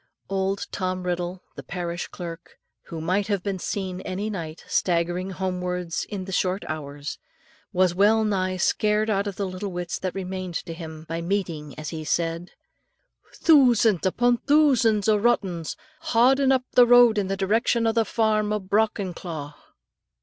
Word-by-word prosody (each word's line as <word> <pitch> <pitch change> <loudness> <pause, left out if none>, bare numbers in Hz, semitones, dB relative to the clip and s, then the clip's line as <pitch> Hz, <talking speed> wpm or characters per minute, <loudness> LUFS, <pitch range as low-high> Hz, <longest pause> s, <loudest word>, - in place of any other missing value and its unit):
Old 195 0 -1
Tom 185 -1 -2
Riddle, 180 +1 -3
the - - -7
parish 175 -1 -4
clerk, 170 -2 -9 0.3
who 165 - -7
might 185 +5 0
have 200 -3 -1
been 195 -2 -2
seen 185 -1 -3
any 200 +4 -3
night, 165 -5 -6
staggering 175 +1 0
homewards 180 -2 -3
in 195 -3 -5
the 190 - -7
short 185 +1 0
hours, 145 -2 -6 0.5
was 180 -1 +2
well 210 +4 +4
nigh 185 -3 0
scared 210 +3 +1
out 200 0 0
of 200 - -4
the 200 - -2
little 185 +1 -5
wits 175 -1 -4
that 185 -1 -3
remained 185 -2 -5
to 165 - -4
him, 160 -2 -9
by 165 +1 -3
meeting, 170 -6 -3
as 155 0 -5
he 160 -2 -5
said, 165 +2 -1 0.9
"Thoosands 240 - +4
upon 240 +5 +2
thoosands 245 -9 +3
o' 215 -1 +4
rottens, 190 -8 0 0.2
haudin' 270 -2 +3
up 260 -1 +2
the 245 -1 +6
road 240 -3 +7
in 195 - -1
the 195 0 -2
direction 225 +4 +1
o' 225 - +3
the 225 0 +2
farm 215 -1 +1
o' 210 - 0
Brockenclough." 185 -7 -2
190 Hz, 160 wpm, -25 LUFS, 175-215 Hz, 0.9 s, road